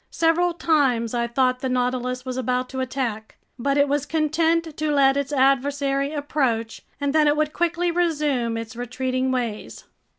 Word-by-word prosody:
Several 335 +1 +1
times 265 -9 +1
I 235 -1 0
thought 255 +1 +1
the 260 0 -2
Nautilus 250 0 -1
was 255 -1 -4
about 255 0 -1
to 260 - -5
attack. 250 -4 -3 0.2
But 275 +3 0
it 285 0 +4
was 290 0 -1
content 320 +1 +1
to 305 -1 -1
let 275 -2 +4
its 280 0 -2
adversary 275 +1 +1
approach, 265 -7 -1 0.2
and 285 0 -1
then 310 -1 +4
it 295 0 +3
would 305 0 0
quickly 345 0 0
resume 295 -9 0
its 230 +1 -7
retreating 255 +2 -2
ways. 235 -4 -4
275 Hz, 165 wpm, -23 LUFS, 250-300 Hz, 0.2 s, it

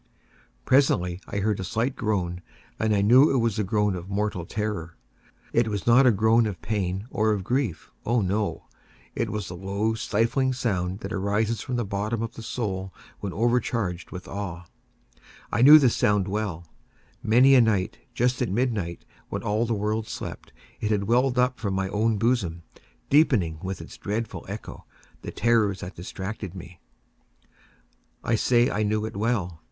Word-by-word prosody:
Presently 90 -10 +2
I - - -4
heard 105 0 0
a - - -3
slight 115 +8 -1
groan, 90 -5 -2 0.4
and 110 -1 +2
I 100 - +2
knew 130 +8 +6
it 135 - +2
was 115 -4 +1
the 105 - +1
groan 105 0 +1
of 90 +1 -7
mortal 100 -4 -2
terror. 105 -6 -3 0.6
It 115 -1 +3
was 105 -2 -3
not 125 +3 +6
a - - +7
groan 110 +2 +3
of 95 -5 -5
pain 95 -2 -2
or 110 0 +1
of 100 -3 -3
grief—oh, 120 - -1
no!—it 100 +2 -4
was 105 -2 -4
the 90 - -7
low 100 +4 -1
stifled 115 +4 0
sound 95 -5 -2
that 100 +3 -5
arises 105 +3 0
from 125 - -4
the 120 -2 -1
bottom 105 +3 -2
of 115 - -5
the - - -9
soul 95 -5 -3 0.3
when 100 - -4
overcharged 115 -4 0
with 90 -1 -8
awe. 90 -3 -5 0.9
I - - +1
knew 145 +4 +10
the 135 -6 +4
sound 105 -3 +2
well. 95 -5 -3 0.6
Many 125 +5 +5
a 130 - +7
night, 105 -5 0 0.2
just 125 +2 +1
at 125 - 0
midnight, 105 -6 -2 0.2
when - - -4
all 110 +3 0
the 115 - 0
world 105 +1 -1
slept, - - -7 0.3
it 105 - -2
has 105 -2 +1
welled 125 +5 +2
up 125 0 +2
from 100 -4 -2
my 95 0 -1
own 110 +2 +1
bosom, 100 -7 0 0.5
deepening, 110 - +3
with 95 0 -4
its - - -10
dreadful 110 +3 -4
echo, - - -7 0.4
the - - -6
terrors 110 -5 +1
that 90 +3 -7
distracted 95 +2 -6
me. 90 -1 -10 1.4
I - - 0
say 120 +2 +3
I 105 - -1
knew 105 0 0
it 110 - -6
well. 100 -6 -1
105 Hz, 170 wpm, -25 LUFS, 95-115 Hz, 1.4 s, knew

